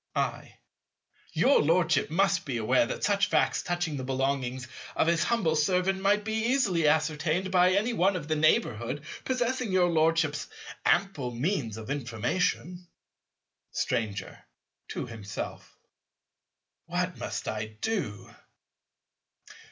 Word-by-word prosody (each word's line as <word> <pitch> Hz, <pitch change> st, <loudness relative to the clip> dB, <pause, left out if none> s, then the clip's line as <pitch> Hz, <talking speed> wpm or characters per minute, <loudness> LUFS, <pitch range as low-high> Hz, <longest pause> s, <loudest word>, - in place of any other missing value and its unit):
I. -, -, -2 dB, 0.8 s
Your 280 Hz, -, +4 dB
Lordship 160 Hz, -2 st, +2 dB
must 195 Hz, +2 st, +2 dB
be 130 Hz, -4 st, -3 dB
aware 120 Hz, +2 st, +2 dB
that -, -, -5 dB
such 205 Hz, 0 st, +2 dB
facts -, -, +2 dB
touching 175 Hz, -4 st, -2 dB
the 130 Hz, -, -4 dB
belongings 130 Hz, -1 st, -1 dB, 0.3 s
of -, -, +3 dB
his 165 Hz, -1 st, +2 dB
humble 195 Hz, -10 st, +1 dB
servant 185 Hz, +5 st, +1 dB
might 205 Hz, +2 st, +3 dB
be 220 Hz, -, -2 dB
easily 200 Hz, -, +2 dB
ascertained 160 Hz, +4 st, +1 dB
by 180 Hz, 0 st, +5 dB
any 215 Hz, +5 st, +1 dB
one 195 Hz, -1 st, +2 dB
of 155 Hz, -5 st, -4 dB
the 155 Hz, -, +1 dB
neighbourhood 145 Hz, -3 st, +1 dB, 0.2 s
possessing 250 Hz, -3 st, -1 dB
your 180 Hz, -2 st, +3 dB
Lordship's 160 Hz, -2 st, +2 dB, 0.4 s
ample 170 Hz, -9 st, +1 dB
means 125 Hz, -, -2 dB
of 110 Hz, +3 st, -6 dB
information. 145 Hz, -, -2 dB, 0.8 s
Stranger. 100 Hz, -4 st, -3 dB, 0.4 s
(to -, -, -4 dB
himself.) 105 Hz, -3 st, -7 dB, 1.1 s
What -, -, -2 dB
must -, -, -4 dB
I 110 Hz, 0 st, -2 dB
do? 190 Hz, -, -3 dB
160 Hz, 120 wpm, -28 LUFS, 130-190 Hz, 1.1 s, by